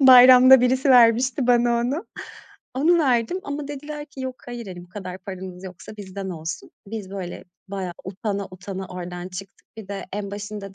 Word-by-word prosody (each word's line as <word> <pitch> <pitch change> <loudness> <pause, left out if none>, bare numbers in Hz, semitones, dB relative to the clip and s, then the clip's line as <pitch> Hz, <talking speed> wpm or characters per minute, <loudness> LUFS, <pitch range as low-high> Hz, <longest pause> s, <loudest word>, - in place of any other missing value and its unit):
Bayramda 255 0 +9
birisi 260 +2 +2
vermişti 245 +1 +5
bana 240 -1 +4
onu, 280 - -2 0.7
onu 330 +6 +4
verdim 260 +3 +1
ama 285 0 -4
dediler 295 +1 -6
ki, 275 - -11
"Yok 260 -1 -4
hayır, 240 -2 -6
hani 180 -2 -8
bu - - -22
kadar 185 -1 -7
paranız 185 -1 -8
yoksa 185 +3 -10
bizden 195 -1 -6
olsun." 160 -1 -6 0.2
Biz 205 -2 -6
böyle 190 -3 -6 0.2
bayağı 190 -3 -4
utana 200 +1 -3
utana 185 +1 -7
oradan 180 0 -6
çıktık. 190 +1 -10
Bir 215 -3 -9
de, 200 -1 -5
en 200 -1 -4
başında 205 -1 -7
205 Hz, 170 wpm, -23 LUFS, 190-255 Hz, 0.7 s, Bayramda